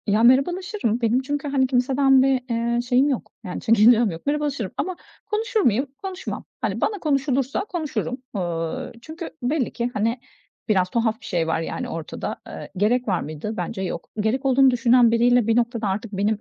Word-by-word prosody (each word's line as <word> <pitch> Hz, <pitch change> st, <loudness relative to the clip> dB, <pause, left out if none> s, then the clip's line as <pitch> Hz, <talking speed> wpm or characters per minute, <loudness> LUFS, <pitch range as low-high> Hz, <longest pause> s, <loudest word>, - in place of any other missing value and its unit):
Ya, 210 Hz, +2 st, +3 dB
merhabalaşırım. 275 Hz, -, +2 dB
Benim 235 Hz, +3 st, +2 dB
çünkü, 290 Hz, +2 st, -3 dB
hani, 270 Hz, -2 st, +2 dB
kimseden 265 Hz, +1 st, +3 dB
bir, 265 Hz, -1 st, +2 dB
eee, 235 Hz, +1 st, 0 dB
şeyim 250 Hz, +3 st, +2 dB
yok, 265 Hz, -, -3 dB
yani 180 Hz, -4 st, -5 dB
çekincem 230 Hz, -1 st, +5 dB
yok, 165 Hz, 0 st, -9 dB
merhabalaşırım 285 Hz, -8 st, -1 dB
ama 370 Hz, 0 st, -2 dB, 0.3 s
konuşur 445 Hz, +2 st, -1 dB
muyum? 250 Hz, -, +2 dB, 0.2 s
Konuşmam. 380 Hz, -1 st, -5 dB, 0.2 s
Hani -, -, -2 dB
bana 420 Hz, -2 st, 0 dB
konuşulursa 275 Hz, -3 st, 0 dB
konuşurum. 310 Hz, -, -3 dB, 0.2 s
Iıı, 165 Hz, -3 st, -3 dB
çünkü 320 Hz, +5 st, -7 dB
belli 255 Hz, +1 st, 0 dB
ki 240 Hz, +1 st, -2 dB
hani 230 Hz, +4 st, 0 dB, 0.5 s
biraz 185 Hz, -3 st, +2 dB
tuhaf 225 Hz, +1 st, 0 dB
bir -, -, -12 dB
şey 170 Hz, -5 st, -1 dB
var 165 Hz, -, 0 dB
yani 165 Hz, -, -4 dB
ortada. 165 Hz, -1 st, -5 dB
Eee, -, -, -8 dB
gerek 240 Hz, +6 st, +2 dB
var 185 Hz, -4 st, +1 dB
mıydı? 155 Hz, +8 st, -5 dB
Bence 225 Hz, -4 st, -3 dB
yok. 185 Hz, -, -4 dB
Gerek 230 Hz, +6 st, 0 dB
olduğunu 270 Hz, 0 st, +5 dB
düşünen 245 Hz, -1 st, +4 dB
biriyle 240 Hz, 0 st, +3 dB
bir 225 Hz, -, +3 dB
noktada 235 Hz, -2 st, 0 dB
artık 200 Hz, +3 st, -3 dB
benim 205 Hz, +2 st, 0 dB
245 Hz, 175 wpm, -23 LUFS, 215-275 Hz, 0.5 s, çekincem